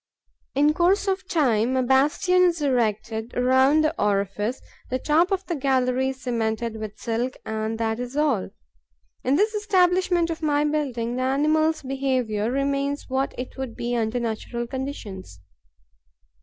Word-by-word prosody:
In 295 +2 +4
course 370 +5 +2
of 380 -1 -1
time, 255 - +2
a 260 - +2
bastion 295 +8 +3
is 350 -2 +3
erected 225 -4 -1
around 260 +4 +4
the 310 +1 +1
orifice; 205 +3 0 0.3
the 255 - 0
top 315 +7 +2
of 385 0 -1
the 345 - -2
gallery 260 -2 +1
is 265 0 -7
cemented 230 -1 -2
with 215 -1 -7
silk; 240 +2 -2
and 220 0 -3
that 225 0 -1
is 250 +3 -5
all. 285 -10 +1 0.7
In 265 - +2
this 425 +7 +2
establishment 365 -4 +2
of 325 - -5
my 295 -1 +2
building, 255 -6 -1
the - - -1
animal's 305 +4 +1
behaviour 255 -5 -1
remains 275 +2 -1
what 265 +1 -1
it 250 - -6
would 260 -4 -5
be 240 +1 -2
under 230 +1 0
natural 235 +1 -3
conditions. 235 - -6
260 Hz, 150 wpm, -24 LUFS, 230-305 Hz, 0.7 s, In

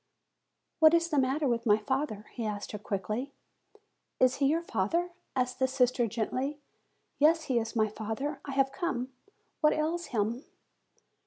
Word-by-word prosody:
"What 315 +1 +7
is 335 0 +2
the 295 -4 +2
matter 270 +3 +1
with 235 -1 0
my 210 0 +6
father?" 215 -1 -2
he 235 - -4
asked 210 -1 -4
her 210 - -5
quickly. 215 +7 -3 0.9
"Is 255 0 +4
he 275 - +3
your 325 +4 +1
father?" 335 - 0 0.3
said 250 0 0
the 260 - +3
sister 255 -2 +2
gently. 255 +6 -2 0.6
"Yes, 320 +2 +5
he 255 -5 +1
is 225 0 -5
my 215 -1 +3
father; 225 +7 -4
I 275 - -6
have 270 0 +2
come. 270 -6 -2 0.5
What 300 -1 +4
ails 330 +3 -1
him?" 230 +3 -1
260 Hz, 160 wpm, -30 LUFS, 225-300 Hz, 0.9 s, What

